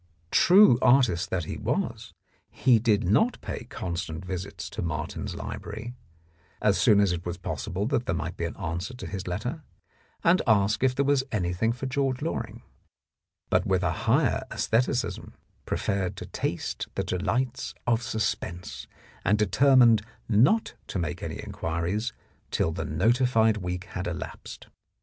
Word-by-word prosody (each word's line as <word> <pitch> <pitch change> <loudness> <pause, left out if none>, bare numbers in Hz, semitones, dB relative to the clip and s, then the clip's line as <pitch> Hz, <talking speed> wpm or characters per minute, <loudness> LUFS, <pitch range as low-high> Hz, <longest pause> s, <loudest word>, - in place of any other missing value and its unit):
True 185 - +7
artist 120 -9 +4
that 90 -2 -1
he - - -5
was, - - -2 0.4
he 120 -3 +3
did 110 -2 +2
not 115 - +2
pay - - -6
constant 85 -5 -5
visits 95 +1 -5
to - - -4
Martin's 80 -2 -3
Library, 110 +4 -6 0.7
as 105 -2 +2
soon 105 -4 +6
as 100 -3 +3
it 85 -1 -3
was 90 0 -4
possible 90 +2 -3
that 125 -1 0
there 85 - +1
might 85 +1 -3
be 85 - -3
an 85 - -5
answer 90 +6 -4
to 125 - -8
his 95 -1 -5
letter, 120 - -3 0.6
and 175 +2 +5
ask 105 +1 +3
if 130 -1 +3
there 140 - +1
was 140 -1 +3
anything 90 +2 0
for 125 +3 -5
George 135 0 -1
Loring, 115 -7 -4 0.9
but - - +2
with 95 -1 +2
a 85 - +2
higher - - +1
aestheticism, 120 +2 -1 0.3
preferred 100 -2 -1
to - - -7
taste - - -3
the - - 0
delights 120 +8 -2
of 115 -1 +2
sus 110 -2 0
pense, 85 -8 -8 0.4
and 105 +3 +3
determined 120 +1 +5 0.3
not 130 - +3
to - - -4
make 85 -2 -3
any - - -4
inquiries 90 +8 -2 0.4
till - - 0
the - - -4
notified 110 - +3
week 90 -2 -4
had - - -5
elapsed. - - -7
105 Hz, 155 wpm, -27 LUFS, 90-125 Hz, 0.9 s, True